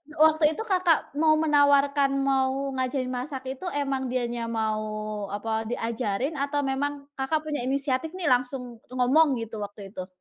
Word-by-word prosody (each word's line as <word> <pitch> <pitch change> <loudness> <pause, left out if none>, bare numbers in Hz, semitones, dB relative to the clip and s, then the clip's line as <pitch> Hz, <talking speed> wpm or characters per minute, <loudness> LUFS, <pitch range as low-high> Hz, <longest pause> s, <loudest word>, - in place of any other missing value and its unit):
waktu 315 +1 +4
itu 445 - -3
Kakak 370 -6 +2
mau 310 0 +5
menawarkan, 285 -2 +4
mau 270 0 +1
ngajarin 255 0 -1
masak 260 +2 -4
itu, 270 +8 -6
emang 275 -2 -1
dianya 240 -2 -2
mau 220 -2 -1 0.6
apa, 220 +1 -2
diajarin 235 +4 -2
atau 285 +1 0
memang 280 +1 -2 0.2
Kakak 305 +4 0
punya 300 -1 -3
inisiatif 275 +4 -1
nih 345 -7 0
langsung 250 -1 -1
ngomong 260 +3 +3
gitu 225 -1 -7
waktu 205 -1 -7
itu? 185 -2 -6
270 Hz, 145 wpm, -26 LUFS, 245-290 Hz, 0.6 s, mau